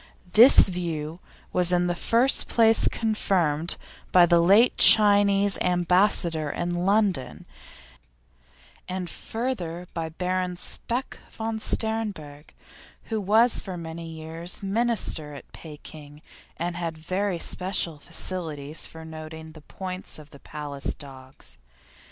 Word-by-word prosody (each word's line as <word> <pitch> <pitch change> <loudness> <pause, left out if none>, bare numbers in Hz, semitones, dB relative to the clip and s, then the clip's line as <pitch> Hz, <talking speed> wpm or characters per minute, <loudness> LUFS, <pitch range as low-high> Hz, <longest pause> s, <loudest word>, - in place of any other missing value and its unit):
This 235 +5 +10
view 170 -3 -5 0.3
was 180 -1 +2
in 175 0 +1
the 175 - -1
first 235 +9 +1
place 225 -1 +5
confirmed 175 -8 -1 0.3
by 180 -1 +6
the 170 0 +3
late 200 +8 +4
Chinese 205 -2 +5
Ambassador 175 -3 +1
in 175 +4 -3
London, 190 -4 -1 1.4
and 185 -1 -4
further 180 -7 -5
by 165 -1 -4
Baron 180 +2 -3
Speck 245 +7 -4
von 220 0 -5
Sternberg, 205 -11 -3 0.6
who 220 -1 -1
was 220 +5 +3
for 185 -3 -7
many 165 0 -8
years 165 +3 -5
Minister 195 -8 -2
at 140 - -13
Pekin 150 -1 -12 0.3
and 170 +1 -4
had 165 -2 -5
very 185 +4 -3
special 175 -3 -1
facilities 155 -3 -4
for 160 0 -12
noting 160 0 -10
the 155 -1 -15
points 185 +4 -8
of 150 -1 -15
the 140 - -15
Palace 145 -2 -4
dogs. 130 - -9
175 Hz, 115 wpm, -24 LUFS, 160-200 Hz, 1.4 s, This